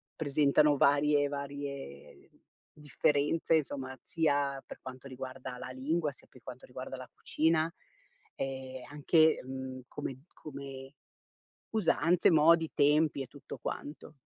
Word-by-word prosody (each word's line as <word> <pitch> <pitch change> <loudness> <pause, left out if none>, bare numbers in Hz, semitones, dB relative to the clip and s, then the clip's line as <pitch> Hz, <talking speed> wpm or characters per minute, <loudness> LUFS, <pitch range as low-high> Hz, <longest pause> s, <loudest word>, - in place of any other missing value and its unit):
presentano 145 0 +3
varie 145 +1 +4
varie 140 - -7 0.4
differenze, 150 +2 +1
insomma, 135 -3 -4
zia 145 -4 0
per - - -10
quanto 130 +1 -9
riguarda 130 -1 -7
la - - -6
lingua, 150 +5 -1
sia 130 - -19
per 130 - -18
quanto 130 0 -9
riguarda 130 +1 -7
la 130 - -9
cucina 160 +1 +1 0.6
e 130 -1 -5
anche, 155 +2 +4
mhmm, 130 0 -6
come 135 +1 -6
come 135 -2 -9 0.8
usanze, 180 -5 +3
modi, 160 +1 +5
tempi 150 0 +3
e 135 - -5
tutto 145 +3 -10
quanto. 150 +1 -6
140 Hz, 120 wpm, -31 LUFS, 130-150 Hz, 0.8 s, modi